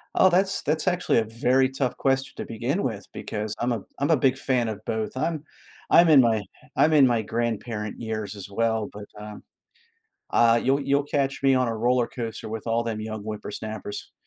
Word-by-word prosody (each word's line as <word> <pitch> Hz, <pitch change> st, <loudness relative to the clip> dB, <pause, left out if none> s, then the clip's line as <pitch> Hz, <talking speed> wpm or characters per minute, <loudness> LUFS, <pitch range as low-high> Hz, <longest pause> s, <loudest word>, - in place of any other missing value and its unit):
Oh, 185 Hz, -, +6 dB
that's 190 Hz, +2 st, +1 dB
that's 155 Hz, +4 st, -1 dB
actually 180 Hz, -7 st, +2 dB
a 115 Hz, -, +4 dB
very 125 Hz, +4 st, +2 dB
tough 130 Hz, -2 st, -2 dB
question 135 Hz, 0 st, 0 dB
to -, -, -4 dB
begin 125 Hz, -, -2 dB
with 105 Hz, -5 st, -3 dB
because 105 Hz, 0 st, -4 dB
I'm 120 Hz, +1 st, 0 dB
a 110 Hz, -4 st, -1 dB, 0.2 s
I'm 140 Hz, +3 st, +1 dB
a 155 Hz, -, +5 dB
big 130 Hz, +1 st, +2 dB
fan 125 Hz, -3 st, 0 dB
of 105 Hz, -1 st, -4 dB
both. 110 Hz, +3 st, -3 dB
I'm 155 Hz, 0 st, -1 dB, 0.5 s
I'm 170 Hz, 0 st, +7 dB
in 145 Hz, -4 st, +8 dB
my 110 Hz, -3 st, +2 dB, 0.3 s
I'm 155 Hz, +1 st, +4 dB
in 140 Hz, -4 st, +7 dB
my 115 Hz, -2 st, +1 dB
grandparent 115 Hz, -1 st, -3 dB
years 110 Hz, -2 st, -4 dB
as 100 Hz, 0 st, -9 dB
well, 110 Hz, 0 st, 0 dB
but, 105 Hz, 0 st, -8 dB
um 105 Hz, 0 st, -9 dB, 0.9 s
Ah, 115 Hz, 0 st, +5 dB
you'll 135 Hz, +4 st, +2 dB
you'll 140 Hz, 0 st, +1 dB
catch 140 Hz, -2 st, -1 dB
me 135 Hz, -1 st, +4 dB
on 125 Hz, -1 st, +2 dB
a 115 Hz, -, -2 dB
roller 120 Hz, +2 st, +2 dB
coaster 115 Hz, -3 st, -6 dB
with 110 Hz, +1 st, -6 dB
all 115 Hz, +1 st, +1 dB
them 110 Hz, -2 st, -3 dB
young 110 Hz, -1 st, -5 dB
whippersnappers, 105 Hz, 0 st, -6 dB
120 Hz, 200 wpm, -25 LUFS, 110-135 Hz, 0.9 s, in